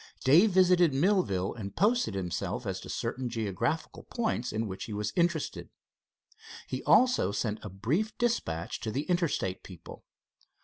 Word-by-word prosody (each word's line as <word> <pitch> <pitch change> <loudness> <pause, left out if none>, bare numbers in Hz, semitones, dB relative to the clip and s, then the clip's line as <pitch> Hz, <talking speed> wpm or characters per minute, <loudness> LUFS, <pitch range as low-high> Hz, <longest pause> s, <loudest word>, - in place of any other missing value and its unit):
Dave 165 +11 +6
visited 180 -5 +4
Millville, 140 - +1
and 100 -4 -7
posted 215 - +2
himself 95 +5 -3
as 95 -2 -3
to - - -10
certain 125 +2 -3
geographical 115 - -2
points 225 - -2
in 110 +1 -2
which 95 -2 -6
he 110 - -7
was 105 0 -3
interested. 170 -3 -1 1.0
He - - -4
also 250 - +4
sent 105 +1 -2
a 105 - -6
brief 135 - -2
dispatch 85 - -1
to 110 - -4
the 135 +7 -2
Interstate 165 - -1
people. 90 -4 -12
125 Hz, 145 wpm, -29 LUFS, -, 1.0 s, Dave